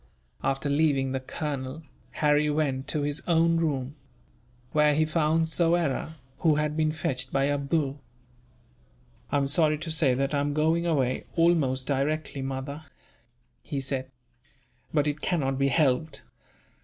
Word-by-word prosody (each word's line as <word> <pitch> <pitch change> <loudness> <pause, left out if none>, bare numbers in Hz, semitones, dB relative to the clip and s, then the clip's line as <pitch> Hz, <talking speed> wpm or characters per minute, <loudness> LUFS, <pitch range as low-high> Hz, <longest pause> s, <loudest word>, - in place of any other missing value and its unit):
After 135 +2 0
leaving 140 -2 +2
the 130 - -1
colonel, 140 +2 -5 0.4
Harry 150 0 +4
went 140 -3 -1
to 150 - -1
his 145 +1 -2
own 165 -1 +3
room; 145 -4 -1 0.8
where 150 0 +4
he 155 +1 +3
found 160 +1 +1
Soyera, 165 -2 +1 0.2
who 160 -3 +3
had 150 0 0
been 155 -1 +1
fetched 130 -4 -2
by 135 0 +2
Abdool. 140 0 -1 1.3
"I - - +2
am 140 - +1
sorry 150 +2 +2
to 160 +2 -5
say 145 -5 +3
that 135 +2 -1
I 145 - +2
am 145 0 -1
going 160 +3 +2
away, 135 -6 0
almost 155 -7 +2
directly, 140 +1 -1
mother," 135 +2 -4 0.8
he 140 - -4
said; 130 -1 -3 0.8
"but 150 -2 +2
it 150 0 -2
cannot 135 -7 0
be 140 - +3
helped." 145 +1 +1
145 Hz, 145 wpm, -27 LUFS, 135-155 Hz, 1.3 s, Harry